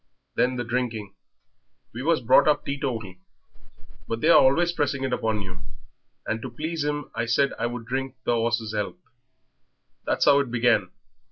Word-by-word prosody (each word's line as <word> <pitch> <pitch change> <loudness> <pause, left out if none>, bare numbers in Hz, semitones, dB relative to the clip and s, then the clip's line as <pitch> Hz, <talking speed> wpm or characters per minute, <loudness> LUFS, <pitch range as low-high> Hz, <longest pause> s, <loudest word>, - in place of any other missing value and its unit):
Then 125 +1 +1
the 120 - -2
drinking. 115 -4 -3 0.8
We 115 - -5
was 160 0 +2
brought 130 +5 +5
up 150 - +2
teetotal, 120 -9 -3 0.9
but 115 - -3
they're 165 +7 +5
always 170 +6 +5
pressing 145 -4 -1
it 130 -1 -1
upon 110 -4 -1
you, 90 -1 -8 0.7
and 110 0 -2
to 130 - -5
please 155 +5 -3
him 145 -1 -3
I 115 - -2
said 135 +4 +2
I - - 0
would 120 -1 -6
drink 135 +2 -3
the 120 - +1
'orse's 115 -1 -1
'ealth. 105 - -3 1.1
That's - - +1
how 140 - +6
it 140 -3 -1
began.... 115 -5 +2
125 Hz, 165 wpm, -25 LUFS, 115-140 Hz, 1.1 s, how